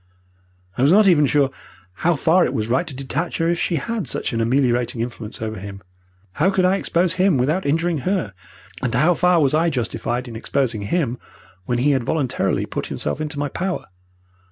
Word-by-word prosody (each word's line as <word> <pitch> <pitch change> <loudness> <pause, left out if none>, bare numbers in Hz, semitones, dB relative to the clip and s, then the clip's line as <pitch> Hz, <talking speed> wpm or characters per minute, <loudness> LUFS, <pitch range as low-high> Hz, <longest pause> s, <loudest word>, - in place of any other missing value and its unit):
I - - +2
was 140 +4 +5
not 205 +2 +6
even 150 -6 +5
sure 140 -1 +2 0.5
how 175 +1 +3
far 165 +5 +3
it - - -1
was 110 0 -1
right 130 +9 +1
to 140 - -7
detach 140 +5 -3
her 165 - +1
if 170 - -1
she 175 - 0
had 215 +7 -3
such - - -2
an 115 - 0
ameliorating 120 -1 +1
influence 115 -2 -5
over 110 -2 -4
him. 100 0 -9 0.5
How 160 - +2
could 190 -2 +2
I 190 +2 +3
expose 175 -2 +1
him 185 -3 +3
without 150 +8 0
injuring 165 +2 +1
her 180 - -1 0.5
and 120 -2 -1
how 155 +8 +4
far 180 0 +3
was 140 -3 +2
I 165 +2 +3
justified 125 -2 -2
in 115 - -8
exposing 115 -1 -1
him 130 -7 -1 0.5
when 120 - 0
he 140 +4 +3
had 135 -3 +1
voluntarily 140 0 0
put - - -4
himself 75 - -3
into 150 -1 -4
my 145 0 -1
power? 185 +6 -3
145 Hz, 200 wpm, -21 LUFS, 120-175 Hz, 0.5 s, not